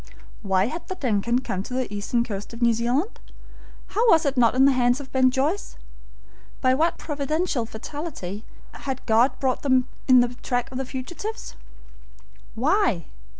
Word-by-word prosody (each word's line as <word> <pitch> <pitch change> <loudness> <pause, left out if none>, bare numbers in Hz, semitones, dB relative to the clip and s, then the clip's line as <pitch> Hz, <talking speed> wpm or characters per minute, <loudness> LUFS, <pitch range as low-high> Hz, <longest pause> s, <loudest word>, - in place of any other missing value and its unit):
Why 190 -2 +2
had 325 +8 -5
the 375 - -4
DUNCAN 235 - 0
come 190 - -2
to 250 +5 -6
the 255 -5 -2
eastern 205 +4 0
coast 210 -1 -6
of 230 - -11
New 235 -1 +5
Zealand? 245 - -1 0.7
How 460 +3 +2
was 325 -4 +5
it 280 -1 0
not 240 -1 +4
in 265 +1 +5
the 275 - +6
hands 245 0 +2
of 275 -2 -10
Ben 260 -1 +4
Joyce? 285 +10 -1 0.8
By 255 -1 +3
what 320 +6 +1
providential 295 -3 -2
fatality 220 - -6 0.3
had 265 -1 -6
God 230 +4 +3
brought 260 -2 0
them 260 -2 +2 0.2
in 255 -2 +7
the 245 0 0
track 245 0 -1
of 260 - -4
the 265 - -2
fugitives? 345 - -6 1.0
Why? 270 - +1
255 Hz, 165 wpm, -24 LUFS, 235-290 Hz, 1.0 s, in